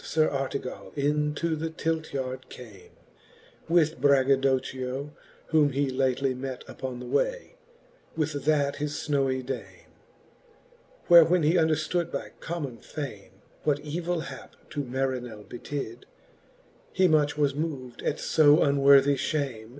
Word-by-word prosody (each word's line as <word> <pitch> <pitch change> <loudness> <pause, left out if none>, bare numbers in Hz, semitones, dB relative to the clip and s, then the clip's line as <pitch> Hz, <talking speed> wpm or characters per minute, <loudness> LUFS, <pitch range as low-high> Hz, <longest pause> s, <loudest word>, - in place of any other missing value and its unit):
Sir 155 -1 +2
Artega// 135 0 -5
into 150 +3 0
the 160 +1 -3
Tilt 160 0 -2
yard 130 -1 -4
came, 110 -7 -12 0.8
With 160 -5 +2
BraggadocchiOj 135 0 +1 0.4
whom 150 -3 +3
he 140 0 0
lately 130 0 +1
met 130 0 -6
Upon 130 -2 -6
the 125 - -7
way, - - -1 0.6
with 155 -1 0
that 145 -2 +2
his 150 0 -3
fnowy 135 -4 -1
dame. 135 - -7 1.1
Where 170 -1 +9
when 175 +1 +2
he 155 +3 +3
underftood 160 +1 +1
by - - -5
common 150 -8 -5
fame, 105 -7 -8 0.2
What 145 -1 +1
evill 170 +2 -2
hap - - -9 0.2
to 145 -1 -2
Marinell 125 -4 -3
betid, 120 0 -6 0.9
He 185 0 +3
much 150 -2 +2
was 145 -2 +2
mov'd 140 -5 -5
at - - -1
lb 150 -1 +5
unworthie 140 -2 +5
fhame. 135 -6 -2
140 Hz, 125 wpm, -27 LUFS, 130-155 Hz, 1.1 s, Where